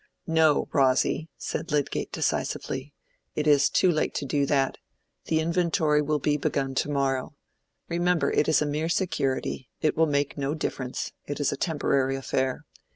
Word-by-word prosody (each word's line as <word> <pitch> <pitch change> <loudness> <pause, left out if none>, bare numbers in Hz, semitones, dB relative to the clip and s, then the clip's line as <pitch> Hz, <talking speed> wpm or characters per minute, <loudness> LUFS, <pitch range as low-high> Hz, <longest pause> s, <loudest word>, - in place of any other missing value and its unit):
"No, 160 -2 +3
Rosy," 135 +4 +2
said - - -4
Lydgate, 145 -2 -1
decisively. 135 +2 -2 0.4
"It 150 - -1
is 145 -2 +5
too 185 - +3
late 155 - -1
to 145 - -2
do 140 +1 0
that. 135 -1 +1 0.5
The 160 - +1
inventory 160 -2 +2
will 150 +1 0
be 145 +1 +1
begun 135 -1 -1
to 135 - 0
morrow. 135 -1 -1 0.5
Remember 175 0 +1
it - - +2
is 155 - +4
a - - -1
mere 150 +2 -1
security: 135 - -1
it 155 - +1
will 160 0 +3
make 145 0 -1
no 140 +2 -1
difference: 130 -4 -3 0.2
it 145 - -4
is 145 - +1
a - - -2
temporary 140 -4 0
affair. 130 -1 -2
145 Hz, 160 wpm, -26 LUFS, 135-160 Hz, 0.5 s, is